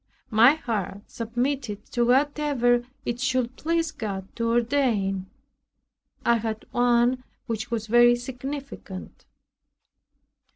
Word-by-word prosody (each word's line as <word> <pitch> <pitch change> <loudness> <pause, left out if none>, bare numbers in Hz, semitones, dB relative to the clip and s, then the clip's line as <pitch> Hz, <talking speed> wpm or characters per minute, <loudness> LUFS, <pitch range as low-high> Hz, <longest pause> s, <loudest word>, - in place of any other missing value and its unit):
My 235 +6 +7
heart 210 - -3
submitted 240 -2 -2
to 240 - +1
whatever 260 -2 +2 0.2
it 240 0 -2
should 255 -1 0
please 330 +1 0
God 195 -8 -6
to 230 0 0
ordain. 230 -6 +1 1.0
I 235 0 +4
had 220 -1 -4
one 245 +1 +3 0.2
which 225 0 -3
was 230 -2 -2
very 240 +2 +6
significant. 260 -5 -7
240 Hz, 100 wpm, -25 LUFS, 225-260 Hz, 1.0 s, My